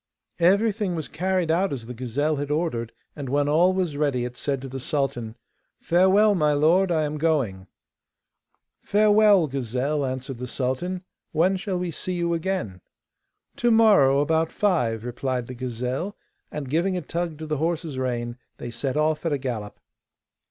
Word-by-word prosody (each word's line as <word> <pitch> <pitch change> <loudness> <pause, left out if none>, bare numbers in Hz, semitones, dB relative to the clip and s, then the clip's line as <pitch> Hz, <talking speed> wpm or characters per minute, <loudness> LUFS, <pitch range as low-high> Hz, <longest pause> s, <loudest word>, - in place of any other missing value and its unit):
Everything 200 +2 +2
was 160 -3 -4
carried 180 0 0
out 185 +4 +1
as 125 -5 -4
the 125 - -7
gazelle 135 +6 -1
had 145 0 -3
ordered, 150 -7 -1 0.2
and 140 -4 -6
when 145 +2 +1
all 165 +5 +4
was 185 -5 -1
ready 140 -4 0
it 125 0 -6
said 140 0 -2
to 135 - -7
the 135 0 -6
sultan: 125 -5 -2 0.4
'Farewell, 190 +5 +4
my 150 -5 +2
lord, 170 +6 +3
I 160 -2 +2
am 150 0 -3
going.' 130 -13 0 1.1
'Farewell, 210 -3 +5
gazelle,' 135 +2 -2
answered 130 -1 -4
the 125 - -4
sultan; 135 +9 -2 0.3
'when 175 +5 +3
shall 190 -1 -2
we 180 -1 -2
see 185 +4 -3
you 170 -1 0
again?' 165 - -2 0.8
'To 240 - +2
morrow 205 - +5
about 160 +2 +1
five,' 120 - 0
replied 125 0 -2
the 130 - -8
gazelle, 125 - -4 0.3
and, 150 -2 -5
giving 175 +7 0
a - - -2
tug 170 +1 -3
to 160 - -6
the 155 -1 -2
horse's 160 -2 -2
rein, 120 -1 -3 0.2
they 120 - -6
set 130 +4 -2
off 155 0 +1
at 165 -3 0
a - - +1
gallop. 120 -6 -5
150 Hz, 165 wpm, -24 LUFS, 130-180 Hz, 1.1 s, Farewell